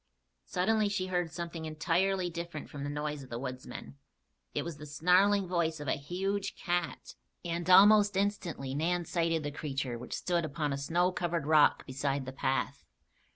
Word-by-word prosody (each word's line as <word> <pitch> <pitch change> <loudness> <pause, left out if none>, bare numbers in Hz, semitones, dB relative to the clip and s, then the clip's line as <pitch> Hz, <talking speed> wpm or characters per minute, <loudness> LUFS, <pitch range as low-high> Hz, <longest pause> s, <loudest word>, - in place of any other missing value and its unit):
Suddenly 215 +3 +1
she 195 -2 -1
heard 175 -3 -1
something 170 -1 -5
entirely 175 +4 +1
different 170 -2 -6
from 140 -1 -6
the 145 - -3
noise 150 0 -3
of 130 - -12
the 115 - -4
woodsmen. 125 - -7 0.5
It - - -2
was 170 -3 -6
the 150 +1 -9
snarling 180 +6 +3
voice 165 -3 0
of 150 - -6
a - - +2
huge 190 +7 -2
cat 175 -1 -2 0.3
and 170 +1 -2
almost 205 +1 +7
instantly 180 -9 -1
Nan 170 +4 0
sighted 165 -2 0
the 145 - -3
creature 135 -5 -3
which 125 - -5
stood 175 -1 0
upon 150 -1 -2
a - - -2
snow 175 +6 +1
covered 170 -4 -2
rock 155 -1 +4
beside 135 0 -2
the 130 - -6
path. 135 +1 -1
165 Hz, 170 wpm, -31 LUFS, 145-180 Hz, 0.5 s, almost